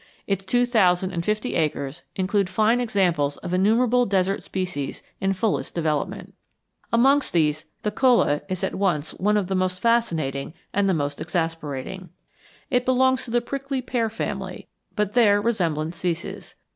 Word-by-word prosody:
Its 195 -1 -1
two 245 +6 +2
thousand 185 -6 +3
and 170 -2 -3
fifty 215 +5 -1
acres 150 -3 -1
include 195 0 +1
fine 225 +4 +2
examples 175 -11 +1
of 175 -1 -6
innumerable 235 +6 +3
desert 195 0 +1
species 180 -7 -4 0.2
in 195 0 +1
fullest 195 +2 -1
development. 155 -4 -2 0.6
Among 270 +5 +5
these 155 -2 +1 0.2
the 210 - 0
cholla 240 - +3
is 185 -1 -3
at - - -1
once 165 -6 0
one 210 +3 +1
of 205 - +1
the 190 - -3
most 185 -1 0
fascinating 165 - 0 0.2
and 200 0 +2
the 190 - +2
most 145 -1 -2
exasperating. 165 +1 -3 0.6
It 250 -1 +3
belongs 260 0 +2
to - - -9
the 240 +1 +2
prickly 275 +2 -3
pear 235 -3 0
family, 195 -4 -5 0.3
but 210 -2 0
there 210 -4 +5
resemblance 170 -7 -1
ceases. 170 -1 -4
190 Hz, 155 wpm, -24 LUFS, 170-230 Hz, 0.6 s, Among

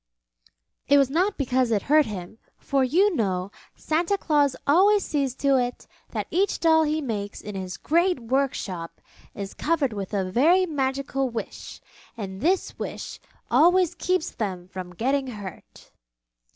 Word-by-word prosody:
It 285 - +6
was 275 -2 +3
not 370 +7 +1
because 255 -2 +1
it 215 -3 +1
hurt 305 +1 +4
him, 205 +1 -7 0.2
for 275 -2 0
you 360 +9 +3
know 190 -5 -1 0.2
Santa 335 +5 0
Claus 290 -6 +2
always 390 +7 +4
sees 275 -4 -1
to 275 -1 +2
it 245 -1 -2 0.2
that - - -3
each 385 +3 +1
doll 320 -1 +5
he 305 +1 0
makes 210 -7 -4
in 210 - -8
his 185 -2 -5
great 345 +2 +1
workshop 230 -9 -2 0.4
is 200 -1 -6
covered 295 -7 0
with 200 -2 -5
a 190 -2 -1
very 335 - +4
magical 270 -3 -1
Wish, 230 -2 -7 0.4
and 190 -2 -6
this 365 +4 0
Wish - - -6 0.3
always 355 +1 +4
keeps 365 -3 -1
them 185 -5 -4
from 185 -1 -7
getting 265 +6 0
hurt. 205 -7 -10
270 Hz, 150 wpm, -25 LUFS, 210-320 Hz, 0.4 s, It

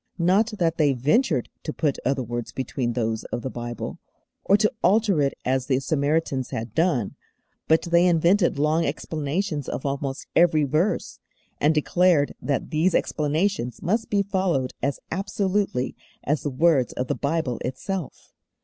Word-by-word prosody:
Not 195 +6 +2
that 165 -2 +1
they 145 -3 +3
ventured 140 - +1
to 155 - -4
put 150 -3 -1
other 135 0 0
words 120 0 -5
between 125 -2 -2
those 115 -2 -1
of 120 - -5
the 130 - -3
Bible, 120 0 -6 0.4
or 200 - +4
to 215 +2 +2
alter 200 -3 +3
it 140 -1 +1
as 130 0 0
the 130 -2 +2
Samaritans 140 -2 0
had 110 -1 -5
done; 160 - +1 0.5
but 160 0 +4
they 170 +1 +4
invented 175 +1 +3
long 155 +3 +2
explanations 155 +1 -2
of - - -4
almost 140 0 -3
every 165 -3 +4
verse, 155 +9 0 0.4
and 150 +2 +3
declared 165 -1 +3
that 140 +2 -2
these 165 +3 +2
explanations 155 -3 -1
must 220 +6 0
be 200 -1 +2
followed 185 -10 0
as 140 +2 -1
absolutely 190 -6 -1 0.3
as 150 +1 0
the 145 - -2
words 140 -1 +2
of 125 - -2
the - - -1
Bible 140 -5 -1
itself. 160 +7 -5
155 Hz, 155 wpm, -24 LUFS, 130-180 Hz, 0.5 s, or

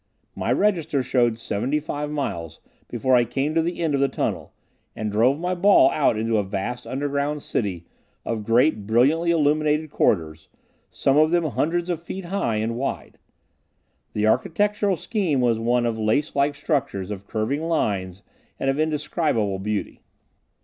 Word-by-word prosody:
My - - -2
register 165 -9 +1
showed 120 -3 +1
seventy 120 +6 -1
five 150 0 -4
miles 85 - -4 0.3
before 125 +2 +1
I 120 - +5
came 135 +6 -2
to 165 - +3
the 170 +1 -3
end 160 -3 0
of 140 - +1
the 140 - +4
tunnel, 130 - -3 0.4
and 110 -1 -3
drove 125 +7 +3
my 180 +2 -1
ball 180 -7 +5
out 140 -7 +2
into 110 0 +1
a - - 0
vast 105 +6 -4
underground 145 +2 -2
city 90 -6 -3 0.4
of 110 -2 -3
great, 115 -1 +2
brilliantly 140 +10 +3
illuminated 155 -1 +2
corridors, 80 - 0 0.4
some 135 +1 +1
of 155 +1 +5
them 170 0 +2
hundreds 165 +3 -1
of 170 -3 -2
feet 185 +2 -7
high 170 - -1
and 110 +2 -2
wide. 135 +2 -4 0.9
The 105 - 0
architectural 200 - +1
scheme 185 - -1
was 120 -3 +2
one 120 +1 +1
of 115 -1 -1
lace 110 +8 0
like 140 +1 +2
structures 140 - -2
of 100 -1 -7
curving 115 +7 -1
lines 100 - -1 0.4
and 135 - +1
of 135 - -3
indescribable 150 - 0
beauty. 105 +1 -3
135 Hz, 160 wpm, -23 LUFS, 110-155 Hz, 0.9 s, I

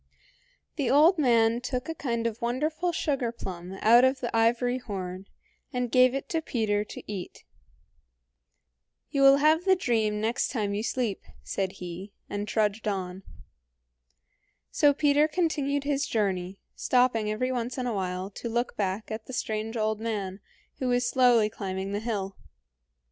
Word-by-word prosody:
The 275 -6 0
old 310 +6 +5
man 235 -3 +3
took 250 0 -3
a 325 - -2
kind 235 -7 -2
of 230 -1 -2
wonderful 305 +9 -1
sugarplum 235 - -3
out 235 +3 +7
of 260 +1 +3
the 240 -2 -3
ivory 240 +2 +2
horn, 190 -4 -6 0.4
and 250 -3 -2
gave 255 0 +5
it 275 - -4
to 325 - 0
Peter 215 -7 0
to - - -10
eat. 195 -4 -7 1.7
"You 280 - 0
will 275 0 +8
have 310 +3 +3
the 380 0 +4
dream 220 - 0
next 225 +3 0
time 210 -5 -1
you 205 - -1
sleep," 235 -3 -2 0.2
said 190 -1 -2
he, 180 +2 -8
and 205 +1 -4
trudged 215 0 0
on. 190 -2 -3 1.5
So 290 - +4
Peter 290 +1 +3
continued 295 -4 0
his 285 0 0
journey, 190 -3 -1 0.2
stopping 245 -4 +2
every 255 +5 -1
once 245 0 -3
in 255 - -2
a 240 - -1
while 185 0 -3
to 235 - -6
look 240 +2 -1
back 200 +2 -2
at 220 0 -6
the 260 - -8
strange 220 0 -3
old 215 -1 0
man, 205 -4 -3 0.4
who 260 - -1
was 245 0 +2
slowly 245 -4 +4
climbing 195 -2 -4
the 205 - -1
hill. 205 -4 -3
230 Hz, 155 wpm, -27 LUFS, 205-260 Hz, 1.7 s, will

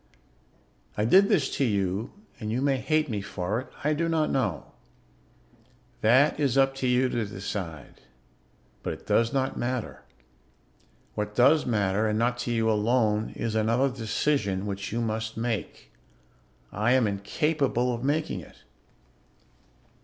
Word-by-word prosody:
"I 105 - +1
did 190 - +6
this 135 -6 +3
to 140 - +2
you 100 -1 -1 0.3
and 110 -1 -4
you 120 - 0
may 140 -1 +2
hate 155 +4 +1
me 105 -6 -3
for 100 +2 -3
it; 130 - -8 0.2
I 150 +2 +2
do 165 +2 -1
not 160 -2 +1
know. 105 - -1 1.3
That 130 +8 +4
is 135 -3 +1
up 135 0 +4
to 130 - -1
you 125 +1 +3
to 120 -2 -1
decide, 95 -6 -6 0.8
but - - -3
it - - -12
does 115 0 +2
not 135 -1 -1
matter. 125 -1 -3 1.1
What 105 0 -4
does 140 +5 +4
matter, 105 -2 +1
and 105 0 0
not 120 +2 0
to 120 - -2
you 115 -1 +1
alone, 110 0 +2
is 115 -2 -3
another 115 +5 +2
decision 105 -4 0
which 100 -1 -4
you 115 +2 -1
must 110 0 -3
make. 115 -2 -4 0.8
I 110 +4 +1
am 130 -3 +4
incapable 125 +5 0
of 120 +1 -5
making 150 +3 0
it. - - -15
115 Hz, 145 wpm, -27 LUFS, 105-135 Hz, 1.3 s, did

